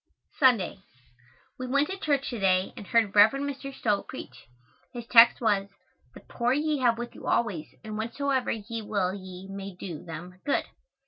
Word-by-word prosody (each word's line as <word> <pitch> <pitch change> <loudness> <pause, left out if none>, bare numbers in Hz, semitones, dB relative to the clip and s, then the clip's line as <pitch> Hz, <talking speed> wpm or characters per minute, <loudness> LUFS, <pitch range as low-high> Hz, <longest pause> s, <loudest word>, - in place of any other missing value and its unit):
Sunday. 235 -9 +3 0.8
We 255 - -4
went 280 +3 +2
to 385 - -4
church 280 -5 0
to 240 - -4
day 185 -1 +2
and 215 -6 -9
heard 225 -4 +2
Rev. 210 +3 +7
Mr. 275 0 -4
Stowe 210 -6 0
preach. 260 - -10 0.5
His 240 -2 -7
text 235 0 +7
was, 205 -4 +1 0.5
"The - - -11
poor 240 +1 -1
ye 300 +1 0
have 240 -3 +3
with 240 0 -6
you - - -10
always 200 -10 0 0.2
and 215 -1 -6
whensoever 260 +3 -1
ye 225 +1 -4
will 200 -3 -1
ye 185 -1 -9
may 195 -1 -7
do 175 -4 -7
them 175 +2 -9
good." 285 - 0
225 Hz, 175 wpm, -27 LUFS, 195-260 Hz, 0.8 s, Rev